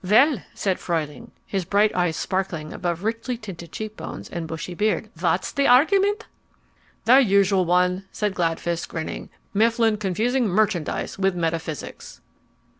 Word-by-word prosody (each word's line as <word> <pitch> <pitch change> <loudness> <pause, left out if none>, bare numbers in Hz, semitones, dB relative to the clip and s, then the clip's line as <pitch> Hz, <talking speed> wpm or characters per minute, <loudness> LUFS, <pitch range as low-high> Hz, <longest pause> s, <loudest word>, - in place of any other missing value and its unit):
"Well," 225 - +4
said 190 -2 -1
Fruehling, 165 +6 -3 0.2
his 195 -2 -2
bright 205 +4 +3
dark 180 - 0
eyes 160 -3 -2
sparkling 180 -5 -2
above 175 0 -3
richly 230 +3 -2
tinted 175 -7 -9
cheek 215 0 -6
bones - - -7
and 170 -2 -4
bushy 160 +3 -5
beard, 215 +3 0
"what's 175 +1 +1
the 280 0 +2
argument?" 395 - +4 0.8
"The 255 +3 +7
usual 195 -5 +4
one," 180 +2 +2
said 210 -2 -1
Gladfist, 170 -1 -1
grinning, 160 -1 -5 0.2
"Mifflin 225 +1 +3
confusing 220 +6 0
merchandise 190 -4 0
with 195 -1 +2
metaphysics." 165 -4 -4
195 Hz, 140 wpm, -24 LUFS, 170-220 Hz, 0.8 s, The